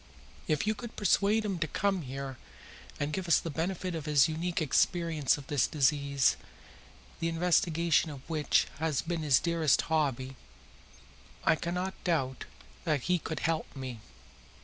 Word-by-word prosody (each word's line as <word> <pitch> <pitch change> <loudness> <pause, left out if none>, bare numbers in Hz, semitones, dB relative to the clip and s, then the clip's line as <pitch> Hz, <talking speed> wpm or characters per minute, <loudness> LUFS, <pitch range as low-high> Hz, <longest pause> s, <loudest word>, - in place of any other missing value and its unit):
If 155 +2 +1
you 215 - +2
could 225 +2 -9
persuade 210 +2 +2
him 195 -4 -2
to 155 - 0
come 195 +4 0
here 135 -1 -6 0.6
and 145 +1 -2
give 185 +1 -3
us 170 - +5
the 165 - -3
benefit 180 +3 -2
of 160 -2 -5
his 145 -3 +5
unique 165 +2 -2
experience 160 -1 +2
of 145 - -10
this 145 -3 +1
disease, 140 -1 +2 0.8
the 165 - 0
investigation 165 -1 +2
of 140 -3 -10
which 155 -3 +2
has 160 -3 0
been 170 -1 -2
his 145 -5 +4
dearest 165 -4 +2
hobby, 135 -4 0 1.1
I - - +4
cannot 180 +3 -3
doubt 135 -7 -1 0.4
that 150 -3 0
he 180 +6 +1
could 160 -2 -5
help 160 -1 -1
me." 130 -4 -6
160 Hz, 150 wpm, -30 LUFS, 140-175 Hz, 1.1 s, us